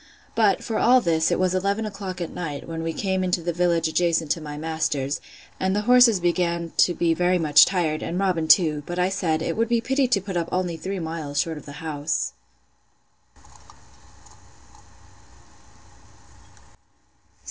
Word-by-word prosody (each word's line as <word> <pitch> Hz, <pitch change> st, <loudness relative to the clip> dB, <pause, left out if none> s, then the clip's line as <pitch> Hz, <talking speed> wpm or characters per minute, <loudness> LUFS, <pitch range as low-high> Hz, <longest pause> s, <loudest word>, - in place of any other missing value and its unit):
But, 210 Hz, -5 st, +2 dB
for 225 Hz, -, -2 dB
all 255 Hz, +2 st, +5 dB
this, 165 Hz, -6 st, +1 dB
it -, -, +1 dB
was 185 Hz, 0 st, +1 dB
eleven 200 Hz, +4 st, -1 dB
o'clock 195 Hz, -3 st, -6 dB
at 170 Hz, -, -4 dB
night, 150 Hz, -5 st, -6 dB
when 165 Hz, -1 st, -5 dB
we 165 Hz, 0 st, -2 dB
came 190 Hz, +2 st, -2 dB
to 180 Hz, -1 st, 0 dB
the 175 Hz, 0 st, -2 dB
village 170 Hz, -1 st, +1 dB
adjacent 165 Hz, -1 st, 0 dB
to 165 Hz, -, -1 dB
my 150 Hz, -1 st, -7 dB
master's; 150 Hz, -3 st, -2 dB, 0.4 s
and 190 Hz, +1 st, 0 dB
the 210 Hz, -, +1 dB
horses 245 Hz, -2 st, +5 dB
began 170 Hz, -1 st, -1 dB
to 175 Hz, -, +4 dB
be 170 Hz, -1 st, +1 dB
very 180 Hz, +2 st, +1 dB
much 155 Hz, -4 st, +6 dB
tired, 170 Hz, -5 st, -1 dB
and 175 Hz, -, -4 dB
Robin 180 Hz, -5 st, 0 dB
too: 155 Hz, -4 st, +4 dB
but 175 Hz, -, -5 dB
I 180 Hz, +1 st, +1 dB
said, 160 Hz, -4 st, -1 dB
It -, -, -2 dB
would 230 Hz, +1 st, 0 dB
be 235 Hz, -1 st, +2 dB
pity 265 Hz, +3 st, 0 dB
to 240 Hz, -5 st, +2 dB
put 190 Hz, -1 st, -7 dB
up 170 Hz, -1 st, -2 dB
only 180 Hz, -2 st, -1 dB
three 195 Hz, +4 st, -5 dB
miles 160 Hz, -4 st, -4 dB
short 160 Hz, -1 st, -2 dB
of -, -, -16 dB
the 145 Hz, -, -8 dB
house. 155 Hz, 0 st, -2 dB
175 Hz, 170 wpm, -23 LUFS, 160-190 Hz, 0.4 s, much